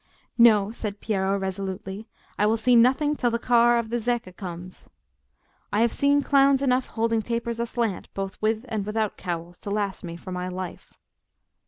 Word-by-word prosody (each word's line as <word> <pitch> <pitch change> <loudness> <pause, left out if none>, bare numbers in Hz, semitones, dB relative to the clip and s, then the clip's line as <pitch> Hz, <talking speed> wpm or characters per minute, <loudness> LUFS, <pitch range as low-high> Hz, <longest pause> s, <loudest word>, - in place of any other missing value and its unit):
"No," 215 -3 +6
said 210 -3 -5
Piero, 195 -2 0
resolutely, 195 +2 -5 0.3
"I 210 - +4
will 225 +1 +2
see 245 +2 +3
nothing 265 +5 +4
till 245 - +1
the 235 - 0
car 240 0 +4
of 230 -1 -2
the 240 - 0
Zecca 235 -5 -2
comes. 180 -1 -8 0.8
I 210 - +2
have 235 -1 +2
seen 285 0 +3
clowns 275 -1 +4
enough 255 -1 +2
holding 225 0 0
tapers 235 +1 -3
aslant, 235 -4 -2
both 195 0 -5
with 220 +2 0
and 220 -4 -2
without 215 0 -1
cowls, 175 -1 -5
to - - -7
last 200 -2 -2
me 170 -1 -6
for 185 - -9
my 180 0 -3
life." 185 -1 -7
220 Hz, 175 wpm, -25 LUFS, 195-235 Hz, 0.8 s, No